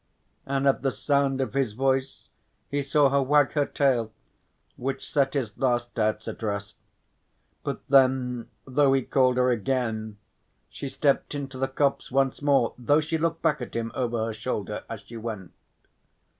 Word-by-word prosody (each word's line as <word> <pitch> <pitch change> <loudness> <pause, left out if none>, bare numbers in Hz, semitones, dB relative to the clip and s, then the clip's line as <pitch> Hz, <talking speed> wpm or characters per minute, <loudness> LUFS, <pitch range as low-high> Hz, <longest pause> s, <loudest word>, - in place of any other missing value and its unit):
and 135 0 +1
at 135 - +3
the 135 - +1
sound 140 -1 +1
of 130 -4 -2
his 135 -6 0
voice 135 +2 -1 0.4
he 145 0 0
saw 140 +1 +3
her 140 +1 +2
wag 145 0 +3
her 145 -2 +1
tail, 125 -6 +1 0.6
which 135 +2 -4
set 140 -1 +1
his 115 -7 -2
last 120 -2 0
doubts 110 0 -1
at - - -6
rest. 100 -2 -3 0.9
But - - -5
then 130 -3 +3 0.2
though 135 +1 +3
he 135 -1 +2
called 130 -1 +2
her 125 0 +3
again, 110 -2 -1 0.5
she 140 - -6
stepped 140 +1 +1
into 135 -2 -5
the 135 - +1
copse 135 +1 0
once 135 +1 +1
more 140 -5 +3
though 145 +5 +3
she 155 +1 -2
looked 165 0 -1
back 150 -2 +2
at - - -7
him 115 0 -2
over 120 -3 -1
her 115 - -3
shoulder 105 -2 -4
as 115 -3 -6
she 115 - -10
went. 110 -5 -6
130 Hz, 170 wpm, -26 LUFS, 115-140 Hz, 0.9 s, at